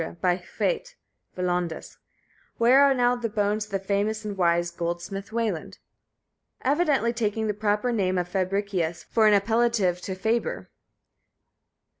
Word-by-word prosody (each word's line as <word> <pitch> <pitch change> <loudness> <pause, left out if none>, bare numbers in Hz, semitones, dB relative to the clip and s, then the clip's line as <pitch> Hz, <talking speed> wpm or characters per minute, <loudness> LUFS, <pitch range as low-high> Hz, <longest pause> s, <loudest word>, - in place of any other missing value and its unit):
by 180 -1 +2 0.2
Hwæt - - -1 0.4
(hwær) 180 - -1
Welondes? 175 -2 -3 0.6
(Where 250 +4 +6
are 280 -1 +5
now 245 0 +3
the 240 -2 -3
bones 210 0 0
of 210 - -21
the 195 - +1
famous 205 +3 -1
and 205 -1 -4
wise 175 -1 +2
goldsmith 175 +4 -4
Weland?), 220 -8 -2 0.9
evidently 280 -4 +2
taking 220 -1 -1
the 210 - 0
proper 210 +3 0
name 190 -5 0
of 175 -1 -1
Fabricius 185 -2 -1
for 220 -1 +2
an 205 -1 +6
appellative 235 +3 +1 0.2
equivalent - - -18
to 190 - -3
faber. 225 +5 -1
210 Hz, 145 wpm, -26 LUFS, 185-230 Hz, 0.9 s, Where